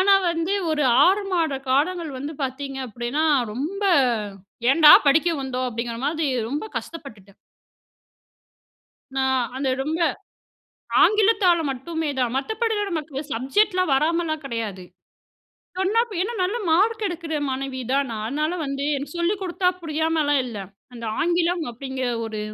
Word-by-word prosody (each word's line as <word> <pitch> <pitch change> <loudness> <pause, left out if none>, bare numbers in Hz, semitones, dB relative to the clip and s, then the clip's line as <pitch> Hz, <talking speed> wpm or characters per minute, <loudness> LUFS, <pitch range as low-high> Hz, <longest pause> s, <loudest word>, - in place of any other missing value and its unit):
ஆனா, 395 +1 +6 0.2
வந்து 335 +3 -1 0.2
ஒரு 300 -1 +1 0.2
6 395 +3 +3
மாத 325 -5 +1 0.2
காலங்கள் 320 +4 +1
வந்து 285 +4 -5
பாத்தீங்க 270 +1 -4
அப்படின்னா 240 +7 -2 0.3
ரொம்ப, 315 - -4 0.9
"ஏன்டா 300 0 +8 0.2
படிக்க 315 +5 +4
வந்தோம்" 255 -1 -2
அப்படிங்கிற 235 0 -4
மாதி 310 +1 0 0.2
ரொம்ப 290 +7 -3
கஷ்டப்பட்டுட்டேன். 215 - -11 1.8
நான் 265 -2 +2
அந்த 270 0 -1
ரொம்ப 315 +4 -2 1.0
ஆங்கிலத்தால 405 -5 +4
மட்டுமே 315 +4 -3
தான். 245 -2 0
மத்தபடியிலா 440 - -1
நமக்கு 310 -5 -4
சப்ஜெக்ட்லாம் 365 - +1
வராமலாம் 315 +1 0
கிடையாது. 220 -7 -4 0.9
சொன்னா, 390 +4 +1
இப்ப 430 - -10
ஏன்னா, 450 +6 -2
நல்ல 390 +6 0
மார்க் 430 +6 +2
எடுக்கிற 335 -3 -4
மாணவி 265 0 -4
தான் 275 0 +2
நான். 215 -1 -4
அதனால 305 +7 -1
வந்து 275 0 -3
எனக்கு 280 +3 -6
சொல்லிக் 380 +4 0
குடுத்தா 360 0 +1
புரியாமலாம் 315 -3 +1
இல்ல. 235 -4 -7 0.4
அந்த 235 -1 -7 0.2
ஆங்கிலம் 345 0 +1
அப்படிங்கிற 260 +1 -4 0.2
ஒரு 220 -1 -5
305 Hz, 130 wpm, -23 LUFS, 265-350 Hz, 1.8 s, ஏன்டா